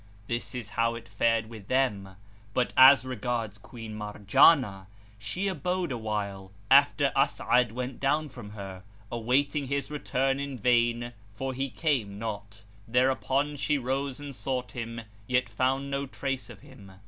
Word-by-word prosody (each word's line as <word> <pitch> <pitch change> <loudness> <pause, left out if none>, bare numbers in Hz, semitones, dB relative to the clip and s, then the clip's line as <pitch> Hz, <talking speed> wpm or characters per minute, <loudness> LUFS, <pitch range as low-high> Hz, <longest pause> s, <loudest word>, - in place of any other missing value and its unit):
This 120 +3 -3
is 120 -4 -5
how 115 +1 0
it 115 0 -9
fared 115 +1 +1
with 110 -4 -11
them; 105 -8 0 0.4
but 125 -1 +1
as 130 0 +8
regards 115 -4 -3
Queen 115 0 -9
Marjanah, 105 - +3 0.3
she 140 - -2
abode 180 -1 -1
awhile, 105 -5 -3 0.2
after - - +5
As'ad 125 -2 +2
went 125 +1 -4
down 150 +3 +1
from 105 -6 -10
her, 95 -3 -8 0.3
awaiting 135 +5 +1
his 140 +2 -2
return 135 -2 0
in 140 -2 -4
vain 120 +1 +2 0.2
for 135 +5 -3
he 135 +2 -2
came 115 -6 -1
not; 105 -2 -6 0.2
thereupon 130 +4 +1
she 145 +1 +1
rose 135 +1 -2
and 145 -1 -7
sought 125 -1 -3
him, 115 -1 -5 0.3
yet 125 0 +2
found 135 +2 0
no 140 0 -2
trace 135 -1 -4
of - - -12
him. 125 -9 -14
125 Hz, 150 wpm, -28 LUFS, 110-135 Hz, 0.4 s, as